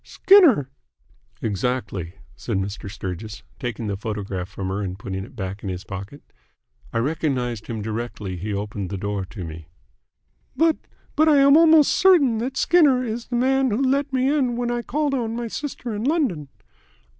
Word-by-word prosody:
"Skinner!" 295 - +5 0.7
"Exactly," 100 -5 -2 0.2
said 115 -5 -3
Mr. 100 0 -4
Sturgis, 100 +2 -6 0.2
taking 120 -2 -4
the 100 -1 -2
photograph 100 -3 -4
from 95 -1 -5
her 95 +2 -2
and 95 -2 -4
putting 95 -1 -5
it 100 - -13
back 95 -2 -5
in 100 - -5
his 90 0 -5
pocket. 100 +8 -8 0.7
"I - - -2
recognised 125 -4 -1
him 110 -3 -4
directly 110 -3 -4
he 100 +5 -5
opened 100 -1 -4
the 100 - -4
door 100 0 -3
to 95 0 -8
me." 80 -1 -8 0.9
"But 325 -1 +3 0.4
but 310 +1 +4
I 295 - +5
am 280 +1 +6
almost 320 -2 +6
certain 295 -12 +4
that 255 +3 -3
Skinner 290 -8 +4
is 230 0 -4
the 245 - -3
man 265 +2 +2
who 215 +2 0
let 275 +1 +1
me 260 0 +1
in 250 -5 0
when 240 0 -1
I 240 0 -1
called 290 +3 -1
on 230 -4 -1
my 235 0 -3
sister 250 -2 -5
in 210 +1 -3
London." 260 - 0
125 Hz, 175 wpm, -23 LUFS, -, 0.9 s, am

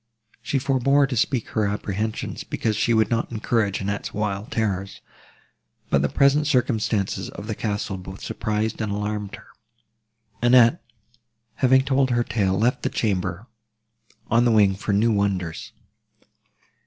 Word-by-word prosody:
She 125 +4 -1
forbore 140 +1 +2
to 135 - -3
speak 125 0 0
her 105 -2 0
apprehensions, 105 +2 -3
because 110 -2 -2
she 115 - +1
would 110 0 +2
not 115 0 -1
encourage 110 -3 0
Annette's 100 +1 -4
wild 105 0 -2
terrors; 100 -3 -2 0.9
but 70 - +3
the 70 - +1
present 140 +2 +3
circumstances 110 -7 0
of 100 - -9
the 110 - -3
castle 105 -2 -3
both 95 +1 -9
surprised, 110 +1 -2
and 110 -2 -2
alarmed 105 0 -3
her. - - -16 1.0
Annette, 120 +4 +5 0.7
having 130 0 +4
told 135 -1 +2
her 120 -1 +2
tale, 100 -5 0
left 120 +5 +1
the - - -1
chamber, 95 -2 -2 0.8
on 115 +1 +3
the 120 - +3
wing 105 -3 +4
for 100 +2 -3
new 110 +3 +3
wonders. 95 -5 -2
110 Hz, 140 wpm, -23 LUFS, 100-120 Hz, 1.0 s, Annette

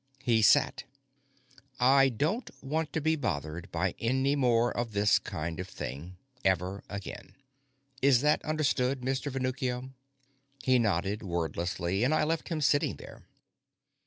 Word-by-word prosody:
He 115 -3 +3
sat. 105 - +4 0.9
"I 135 +2 +5
don't 155 - -1
want 155 +2 -2
to - - 0
be 160 +1 +1
bothered 85 - -4
by 90 +2 0
any 130 +4 +1
more 120 -3 +2
of 115 -2 -3
this 105 0 +4
kind 80 +2 -5
of 90 - -4
thing. 90 -1 -7 0.3
Ever 95 +1 0
again. 100 -1 -8 0.7
Is 135 -3 +5
that 150 +1 +2
understood, 140 -4 0
Mr. 135 +2 -2
Venuccio?" 130 0 -2 0.7
He 130 -1 +4
nodded 100 -1 0
wordlessly, 85 +2 -2
and 140 +5 +3
I 155 - +2
left 160 +1 -1
him 160 -3 -2
sitting 145 0 +2
there. - - -13
125 Hz, 135 wpm, -29 LUFS, 95-140 Hz, 0.9 s, I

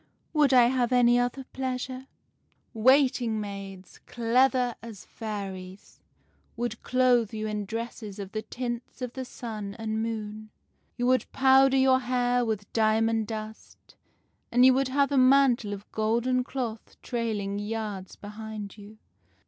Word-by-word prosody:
' - - -44
Would 300 -4 +4
I 250 -2 +7
have 245 0 +1
any 245 -1 +5
other 245 +2 -1
pleasure? 260 0 -4 0.2
' - - -46
" - - -40
' - - -43 0.2
Waiting 255 -5 +3
maids, 195 -2 -8
clever 250 +1 +2
as 225 -4 -10
fairies, 195 -3 -7 0.6
would 240 0 -3
clothe 250 -3 +2
you 215 0 -3
in 210 -1 -3
dresses 225 -1 -6
of 200 -2 -7
the 215 - -3
tints 240 +2 -6
of 250 -1 -4
the 260 - -5
sun 215 -5 -7
and 220 -1 -2
moon. 215 -1 -5 0.5
You 245 - -1
would 255 -2 +2
powder 270 0 +5
your 260 0 +4
hair 245 -1 +1
with 215 -3 -3
diamond 225 0 +2
dust, 220 0 -9 0.6
and 245 +1 +5
you 260 - +7
would 270 +1 +1
have 280 +2 +1
a 275 - +3
mantle 255 -4 +4
of 200 0 -8
golden 235 +4 +1
cloth 240 -4 -5
trailing 215 -5 -2
yards 205 -3 -5
behind 210 0 -8
you. 205 +2 -13
230 Hz, 150 wpm, -27 LUFS, 215-255 Hz, 0.6 s, I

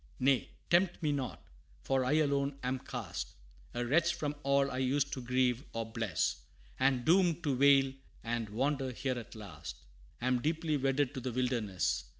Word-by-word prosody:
Nay, 135 -1 +3 0.2
tempt 175 0 +3
me 150 - +2
not! 140 -3 -3 0.4
for 135 -1 +1
I 130 +3 +1
alone 140 -2 +2
am 130 +1 -1
cast, 85 - -5 0.4
A 120 0 -1
wretch 170 +7 +3
from 145 -1 -2
all 140 0 +2
I 130 - -2
used 140 +2 +1
to 130 - -4
grieve 125 0 +1
or 115 0 -2
bless; 110 -6 -1 0.4
And 130 -2 +2
doomed 175 -1 +4
to 145 -4 +1
wail 135 0 +5 0.3
and 115 -2 -2
wander 135 +4 0
here 130 0 -2
at 115 - -11
last, 80 - -8 0.4
Am 125 0 +1
deeply 160 +2 0
wedded 135 0 +1
to 135 - -4
the 125 0 -3
wilderness. 120 - 0
130 Hz, 165 wpm, -33 LUFS, 120-145 Hz, 0.4 s, wail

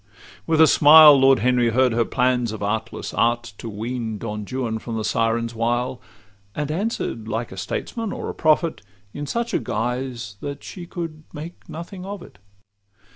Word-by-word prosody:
With 160 -1 +2
a 160 - +9
smile 150 0 +9
Lord 135 0 +5
Henry 125 -2 +3
heard 125 +2 +3
her 115 0 +2
plans 125 -2 +1
of 110 -2 -6
artless 110 +3 -3
art 115 -1 0
To 115 - -6
wean 110 +1 -4
Don 105 -1 -5
Juan 120 -4 -2
from 115 0 -5
the 110 - -2
siren's 115 +1 0
wile; 120 +2 -1 0.5
And 150 0 -2
answer'd, 165 - -3
like 115 +2 -3
a - - -8
statesman 215 - -4
or - - -5
a - - -4
prophet, 155 +1 +1 0.3
In 145 0 -5
such 235 +5 -2
guise 120 -2 -3
that 140 0 -6
she 175 -2 -9
could 165 -3 -6
make 160 +4 -9
nothing 180 +3 -8
of 195 -1 -7
it. - - -16
125 Hz, 170 wpm, -22 LUFS, 115-155 Hz, 0.5 s, a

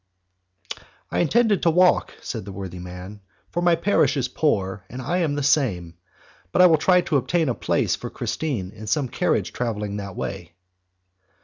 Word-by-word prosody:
"I - - 0
intended 215 +4 +3
to 170 - +3
walk," 180 +2 +3
said 110 -4 -4
the 100 - -8
worthy 95 -2 -7
man, 90 +3 -9 0.3
"for 175 - -1
my 175 -1 +4
parish 170 -3 +2
is 130 -2 0
poor 100 -12 -1
and 125 - -7
I 175 +8 -1
am 155 -5 0
the 145 - -2
same, 115 - +1 0.6
but - - 0
I 180 - +9
will 160 -3 +5
try 180 +2 +4
to 155 -4 +1
obtain 160 +2 +1
a - - +1
place - - 0
for - - -7
Christine 120 -13 -3
in 110 +1 -10
some 140 +5 +1
carriage - - -1
travelling 105 -4 -3
that 100 -2 -6
way." 90 -3 -5
125 Hz, 180 wpm, -23 LUFS, 100-165 Hz, 0.6 s, I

